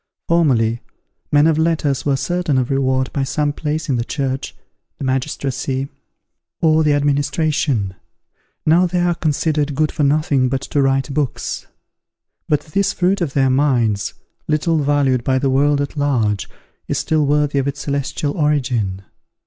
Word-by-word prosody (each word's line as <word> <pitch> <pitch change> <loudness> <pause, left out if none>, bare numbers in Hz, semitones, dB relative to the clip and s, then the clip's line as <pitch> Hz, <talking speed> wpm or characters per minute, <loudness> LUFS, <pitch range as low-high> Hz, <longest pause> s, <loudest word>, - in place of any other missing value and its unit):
Formerly, 120 -9 +2 0.5
men 145 +1 +5
of 160 -1 +3
letters 160 -4 0
were 140 - +3
certain 175 -1 -1
of 130 +1 0
reward 130 -1 0
by 140 - -1
some 145 +2 -1
place 155 +1 -3
in 135 -4 +1
the 115 - 0
church, 135 0 -3 0.4
the - - -7
magistracy, 135 0 -2 0.7
or 160 -1 +3
the 150 -1 +3
administration; 145 - 0 0.7
now 170 +4 +4
they 180 +1 -1
are 175 0 +2
considered 150 -2 0
good 155 +1 +1
for - - -3
nothing 140 -2 +2
but 135 0 -1
to 140 +1 -1
write 135 0 +1
books. 145 -4 -2 0.8
But 150 - +2
this 195 +5 -1
fruit 185 +2 +1
of 150 -6 -1
their 135 -2 +3
minds, 125 -7 +1 0.3
little 155 +1 +1
valued 140 -4 +1
by 130 +1 +1
the 135 0 +1
world 145 +2 +3
at 145 +1 -3
large, 120 -9 0 0.4
is - - -1
still 155 -1 +1
worthy 145 -1 +2
of 135 - -1
its 140 +1 -3
celestial 140 +1 -2
origin. 125 - 0
145 Hz, 155 wpm, -19 LUFS, 130-155 Hz, 0.8 s, men